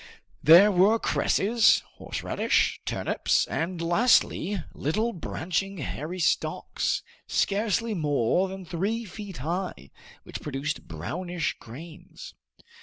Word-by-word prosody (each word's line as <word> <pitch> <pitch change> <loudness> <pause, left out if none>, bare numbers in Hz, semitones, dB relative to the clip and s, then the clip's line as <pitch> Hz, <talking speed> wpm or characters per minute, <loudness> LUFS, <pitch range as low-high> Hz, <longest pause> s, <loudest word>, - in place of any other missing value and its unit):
There 175 +8 +8
were 200 +4 +4
cresses, 225 0 +3 0.2
horseradish, - - 0
turnips, - - +1
and 170 +2 -3
lastly, 190 +1 +2
little 215 - -1
branching 185 +3 -3
hairy 155 +3 -5
stalks, 175 - 0 0.2
scarcely 215 +2 0
more 150 - +1
than 190 0 -8
three 200 +7 -2
feet 200 -3 -8
high, 175 - -4 0.3
which - - -8
produced 145 +1 -4
brownish 170 - -3
grains. 155 +8 -11
180 Hz, 100 wpm, -26 LUFS, 155-205 Hz, 0.3 s, There